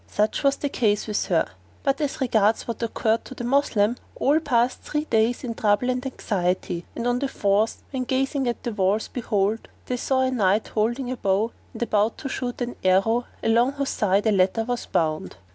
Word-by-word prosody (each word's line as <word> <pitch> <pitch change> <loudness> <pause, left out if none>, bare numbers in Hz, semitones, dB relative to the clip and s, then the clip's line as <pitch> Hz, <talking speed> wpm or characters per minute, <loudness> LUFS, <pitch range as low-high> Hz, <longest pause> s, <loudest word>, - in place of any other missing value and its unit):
Such 210 +1 0
was 275 -1 +3
the 285 - -2
case 210 -6 +1
with 210 -1 -1
her; - - +2 0.4
but 275 0 +1
as 290 0 -2
regards 220 -4 +2
what 235 - -4
occurred 225 0 0
to 260 - -9
the 245 - -6
Moslems, 240 -4 +2 0.2
all 295 +3 +3
passed 250 -5 +1
three 300 0 -2
days 225 0 +1
in 240 -2 -3
trouble 220 +3 +2
and 250 0 -2
anxiety, 180 -8 -2
and 235 - -3
on 245 0 +1
the 280 - 0
fourth 210 -2 0
when 260 -2 -2
gazing 270 +1 0
at 240 - -2
the 235 - -3
walls 205 +2 +1
behold, 215 -2 -1 0.2
they 250 - -2
saw 260 +1 +1
a 260 0 +1
knight 210 -3 +2
holding 240 +4 -1
a 255 - -3
bow 200 +3 +1 0.2
and - - -3
about 215 -1 +1
to 275 - -5
shoot 250 -1 -4
an 245 0 -3
arrow 195 +6 +3 0.2
along 235 +4 +3
whose 280 -1 -2
side 200 0 +1
a 220 - +4
letter 195 +3 +2
was 245 +1 -3
bound. 155 -2 -1
235 Hz, 200 wpm, -24 LUFS, 210-255 Hz, 0.4 s, a